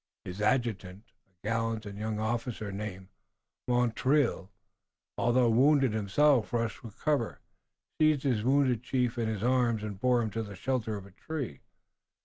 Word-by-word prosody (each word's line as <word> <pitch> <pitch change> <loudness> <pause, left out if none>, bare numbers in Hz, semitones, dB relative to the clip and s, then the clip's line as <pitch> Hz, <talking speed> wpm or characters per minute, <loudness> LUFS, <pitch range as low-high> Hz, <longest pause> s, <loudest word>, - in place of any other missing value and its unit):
His 95 +3 -6
adjutant, 105 -4 0 0.2
a 95 +2 -12
gallant 115 0 -1
young 105 +2 -4
officer 110 -1 -2
named 95 -2 -6 0.6
Montreuil, 125 -2 +1 0.7
although 120 0 +3
wounded 135 0 +4
himself, 110 +4 +2
rushed 115 -2 -1
from 115 - -10
cover, 120 +1 -1 0.6
seized 155 -3 +3
his 120 -7 +1
wounded 130 -2 +3
chief 125 -1 -1
in 115 - 0
his 110 -2 -3
arms 120 -3 +2
and 100 -3 -5
bore 125 0 +3
him 110 - -3
to 115 - -2
the 100 -2 -7
shelter 110 0 -2
of 100 - -9
a 100 - -15
tree. 130 - -6
115 Hz, 145 wpm, -30 LUFS, 105-130 Hz, 0.7 s, wounded